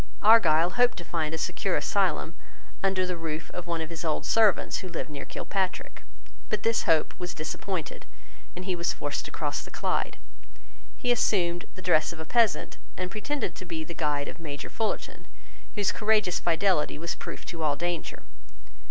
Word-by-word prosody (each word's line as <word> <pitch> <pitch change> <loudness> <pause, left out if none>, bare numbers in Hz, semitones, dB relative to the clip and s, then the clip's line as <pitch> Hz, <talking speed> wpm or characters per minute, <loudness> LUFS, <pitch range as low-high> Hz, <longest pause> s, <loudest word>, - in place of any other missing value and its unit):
Argyle 175 -6 +6
hoped 245 +4 +3
to 175 - -5
find 160 -2 -1
a 160 - -2
secure - - 0
asylum - - +1 0.5
under 190 -1 +2
the 180 0 -2
roof 160 -1 -4
of 180 -1 -6
one 170 -1 -1
of 160 +1 -5
his 165 0 -5
old 155 -2 0
servants 220 -4 +4
who 185 - -6
lived 165 -2 -4
near 145 - -5
Kilpatrick. 190 -2 -3 0.5
But - - -1
this 230 0 +2
hope 160 -2 +3
was 180 0 -4
disappointed; 160 +1 -4 0.5
and 180 +1 -6
he 185 -2 0
was 170 0 0
forced - - -3
to - - -5
cross - - -2
the - - -10
Clyde. - - -1 0.8
He 245 - +1
assumed 175 -7 +2
the 185 - -10
dress 165 -4 +3
of 170 - -9
a 160 - -5
peasant 230 +4 +2 0.2
and 185 0 -3
pretended 275 +5 -2
to - - -8
be 165 -2 -3
the 170 - -7
guide 150 -3 0
of - - -7
Major 145 -4 -6
Fullarton, 220 -1 -3 0.5
whose 205 -3 +2
courageous 210 -4 +2
fidelity 175 -2 +2
was 170 +2 -2
proof - - -7
to 165 -2 -6
all 150 -2 +2
danger. 170 +2 -3
175 Hz, 180 wpm, -28 LUFS, 160-195 Hz, 0.8 s, Argyle